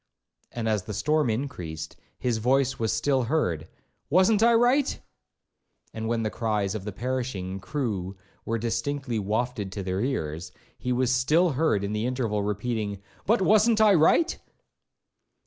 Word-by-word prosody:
And 115 -2 -3
as 105 -4 0
the 105 - -5
storm 150 +4 +1
increased, 90 - -4 0.2
his 120 -3 -1
voice 135 +3 +1
was 110 -1 0
still 135 -3 +1
heard, 90 - 0 0.4
'wasn't 190 +6 +4
I 235 0 +5
right?' 250 +4 +3 0.9
And 110 0 -4
when 115 0 0
the 110 - -1
cries 105 -4 -1
of 105 -3 -5
the 105 - -3
perishing 115 -5 -3
crew 100 -7 -3 0.3
were 115 - -1
distinctly 120 +2 -2
wafted 105 0 -2
to 100 - -4
their 95 +1 -2
ears, 90 - -3 0.2
he 125 - -4
was 125 0 +2
still 155 +7 +3
heard 130 -8 +1
in 100 +1 -2
the 105 +3 -1
interval 120 -5 -1
repeating, 105 0 -2 0.3
'But 210 -1 +3
wasn't 215 +3 +4
I 215 -2 +6
right?' 190 - +3
120 Hz, 150 wpm, -26 LUFS, 105-145 Hz, 0.9 s, I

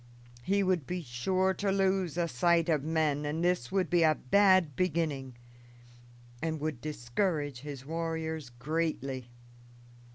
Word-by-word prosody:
He 200 +8 +1
would 185 -7 0
be 180 -1 -3
safe 185 +10 0
to 200 -1 0
lose 190 -4 +1
a 170 -1 +1
sight 170 +4 +2
of 150 -4 +2
men, 155 -2 +1
and 150 +3 -2
this 175 -8 +1
would 190 -1 +1
be 175 -1 +2
a 155 -1 +5
bad 185 0 +4
beginning, 155 -7 -1 1.1
and 160 -1 -2
would 150 -5 -3
discourage 145 - -2
his 140 -1 -8
warriors 160 -2 -3
greatly. 135 -1 -3
160 Hz, 135 wpm, -30 LUFS, 140-180 Hz, 1.1 s, a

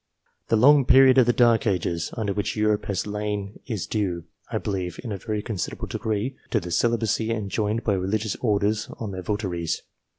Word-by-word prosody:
.The - - +2
long 140 +5 +6
period 130 0 +7
of 125 - +5
the - - +6
dark 120 -2 +3
ages 85 -3 -1
under 105 -3 -1
which 105 0 -2
Europe 105 -1 +1
has 100 -3 -2
lain 105 -1 -4
is 110 -8 -3
due, 95 -6 -2 0.3
I - - 0
believe, 90 -4 -3
in 120 - -5
a 100 - -3
very 105 +1 -3
considerable 100 -8 -4
degree, 110 +4 -2
to - - +2
the 90 0 -7
celibacy 115 +1 +1
enjoined 110 0 -1
by 105 - +1
religious 100 +3 -1
orders 105 -1 0
On 110 -3 -5
their 95 -1 -5
votaries. 90 -5 -2
105 Hz, 185 wpm, -25 LUFS, 100-115 Hz, 0.3 s, period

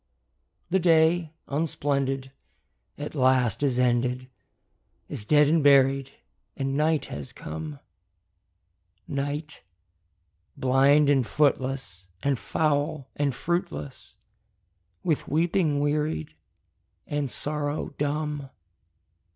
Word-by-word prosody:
The 190 - +4
day, 165 -1 +3 0.2
unsplendid, 140 -3 -1 0.7
at 145 +1 -6
last 130 -5 +2
is 135 -4 +1
ended, 125 +1 +1 0.8
Is 105 - -6
dead 150 +4 +5
and 160 0 +3
buried, 135 -1 +5 0.5
and 135 0 -1
night 155 +1 +2
has 70 -2 -7
come; 75 -1 -7 1.3
Night, 145 +2 -4 1.0
blind 135 +3 +4
and 140 -2 +4
footless, 130 -8 0
and 140 -4 +1
foul 145 -2 -1
and 140 -3 0
fruitless, 75 - -4 0.9
With 160 -4 0
weeping 160 -1 +1
wearied, 145 - -1 0.7
and 145 -2 -2
sorrow 150 +2 -3
dumb. 145 -1 -2
140 Hz, 90 wpm, -26 LUFS, 130-150 Hz, 1.3 s, dead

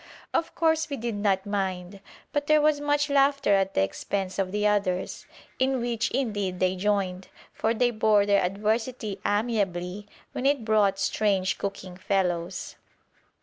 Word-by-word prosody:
Of 330 - -1
course 320 -1 +2
we 280 - -3
did 235 0 -3
not 200 -2 0
mind, 190 -2 -3 0.3
but 290 0 -1
there 305 0 +5
was 300 -1 +2
much 290 0 +1
laughter 275 -4 +3
at 195 -1 +1
the 95 - +3
expense 190 - -3
of 190 -1 0
the 210 +1 -1
others, 200 -3 0 0.3
in 260 0 +2
which 235 -1 -1
indeed 205 -8 -2
they 185 0 +2
joined, 190 -1 -1 0.3
for 220 - 0
they 245 +1 +2
bore 215 -2 +3
their 200 -1 +3
adversity 215 +3 -2
amiably 205 -3 -1 0.2
when 265 - -1
it 280 -5 +1
brought 210 -3 +3
strange 195 -1 0
cooking 195 -2 -5
fellows. 185 -2 -2
205 Hz, 150 wpm, -26 LUFS, 190-240 Hz, 0.3 s, there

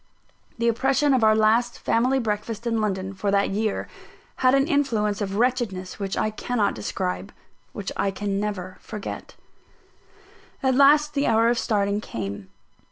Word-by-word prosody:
The 235 0 0
oppression 270 +5 +2
of 255 -3 +2
our 215 0 +5
last 225 +3 +2
family 255 +4 +1
breakfast 220 -1 -3
in 230 -2 0
London, 190 -2 -2
for 195 +1 -2
that 200 0 +2
year, 215 +1 -1 0.5
had 255 +1 +4
an 275 +1 +3
influence 230 -10 0
of 195 -1 -2
wretchedness 225 -6 -1
which 195 -1 -3
I 215 - 0
cannot 215 0 -1
describe 90 -3 -4 0.4
which - - -5
I 200 - 0
can 195 0 -2
never 190 -3 -4
forget. 210 -3 -7 1.3
At 260 -1 +3
last 295 +3 +5
the 280 0 +1
hour 225 +1 +4
of 240 0 +1
starting 205 -2 0
came. 100 - -6
215 Hz, 155 wpm, -24 LUFS, 200-245 Hz, 1.3 s, our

